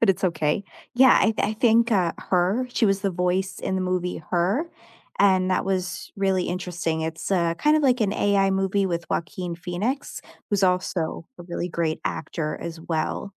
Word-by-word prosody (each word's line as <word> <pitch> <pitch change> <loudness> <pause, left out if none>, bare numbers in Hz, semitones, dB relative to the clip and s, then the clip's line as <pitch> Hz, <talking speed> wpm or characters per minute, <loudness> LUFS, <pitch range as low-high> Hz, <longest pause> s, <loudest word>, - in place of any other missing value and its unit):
but 230 - +3
it's 190 0 -2
okay. 165 +1 0 0.3
Yeah, 260 +1 +7
I 220 +2 +3
I 210 - +1
think, 235 +1 +3
uh, 185 -6 +2
Her, 190 +7 +1
she 235 - +2
was 195 -1 +1
the 200 -1 0
voice 185 +1 -1
in - - -2
the 190 - 0
movie 180 -1 -1
Her, 195 - +1 0.5
and 185 -2 +4
that 185 - +1
was 185 -2 -3
really 190 -2 +1
interesting. 175 -2 -2
It's 160 +2 -4
a 170 -3 +1
kind 300 +1 +4
of 310 - +1
like 255 -3 +3
an 205 -3 +2
AI 200 -2 +2
movie 195 +1 +1
with 170 -2 -3
Joaquin 170 0 -3
Phoenix, 200 +11 -3 0.3
who's 205 -1 +1
also 180 -3 0
a - - -8
really 175 0 -4
great 165 -2 -1
actor 155 -2 -3
as 165 -1 -6
well. 160 +3 -2
185 Hz, 185 wpm, -24 LUFS, 175-200 Hz, 0.5 s, Yeah